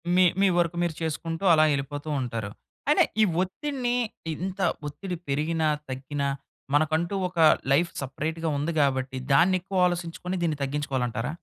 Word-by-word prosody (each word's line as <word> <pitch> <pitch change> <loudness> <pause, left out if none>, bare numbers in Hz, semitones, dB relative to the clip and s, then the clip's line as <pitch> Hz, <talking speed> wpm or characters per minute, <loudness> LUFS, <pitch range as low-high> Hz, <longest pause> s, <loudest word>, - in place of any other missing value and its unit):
మీ 185 - +6 0.2
మీ 200 - +6
work 175 0 +1
మీరు 170 -2 0
చేసుకుంటూ 165 +2 -3
అలా 155 -1 +6
ఎళ్ళిపోతూ 145 +2 -4
ఉంటారు. 115 -4 -3 0.4
అయినా 300 - +6 0.2
ఈ - - +7 0.2
ఒత్తిడిని 245 +5 -2 0.4
ఇంత 190 +3 -5 0.3
ఒత్తిడి 180 +5 -5
పెరిగినా, 155 +3 +1 0.2
తగ్గినా 140 +2 -3 0.5
మనకంటూ 160 +5 +2
ఒక 175 -1 -6 0.3
లైఫ్ 170 +5 +3
సెపరేట్‌గా 160 +5 -3
ఉంది 150 +4 -1
గాబట్టి 130 -1 +1 0.2
దాన్ని 180 +6 +5
ఎక్కువ 185 -1 +1
ఆలోసించుకొని 175 +1 -3
దీన్ని 155 -3 0
తగ్గించుకోవాలంటారా? 135 -3 -2
160 Hz, 135 wpm, -26 LUFS, 140-180 Hz, 0.5 s, ఈ